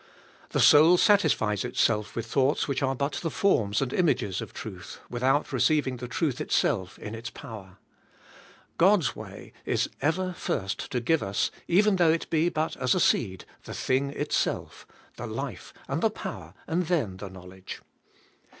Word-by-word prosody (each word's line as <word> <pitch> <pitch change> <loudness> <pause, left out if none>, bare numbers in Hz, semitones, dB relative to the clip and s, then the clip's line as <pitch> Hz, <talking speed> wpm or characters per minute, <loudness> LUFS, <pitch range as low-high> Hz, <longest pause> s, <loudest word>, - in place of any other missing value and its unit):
The - - -1
soul 160 +4 +7
satisfies 110 - +3
itself 115 -3 0
with 115 - -3
thoughts 135 +4 +1
which 140 -1 -1
are 135 -1 +1
but 140 +3 -2
the 165 - -1
forms 115 - +1
and 130 - -4
images 125 - +1
of - - -7
truth, - - -8
without 130 +4 +1
receiving 145 -5 +2
the 125 +1 -6
truth 145 +1 -1
itself 90 -1 0
in 105 - -7
its 115 +1 -6
power. 105 -8 -10 1.0
God's 180 - +4
way - - -10
is - - 0
ever 180 +5 0
first 95 - -3
to 125 - -1
give 160 +6 +2
us, 100 +1 -1 0.2
even 200 +3 +4
though 170 -3 +5
it 165 - -1
be 165 +2 +3
but 155 -1 -2
as 130 -2 +2
a - - +1
seed, 95 -5 +1 0.2
the - - -7
thing 135 +2 0
itself, 140 - -2 0.3
the - - -5
life - - -6 0.2
and - - -2
the - - +3
power,, - - -8
and 175 +1 -1
then 135 - 0
the 95 0 -7
knowledge. 95 0 -10
135 Hz, 165 wpm, -27 LUFS, 105-165 Hz, 1.0 s, soul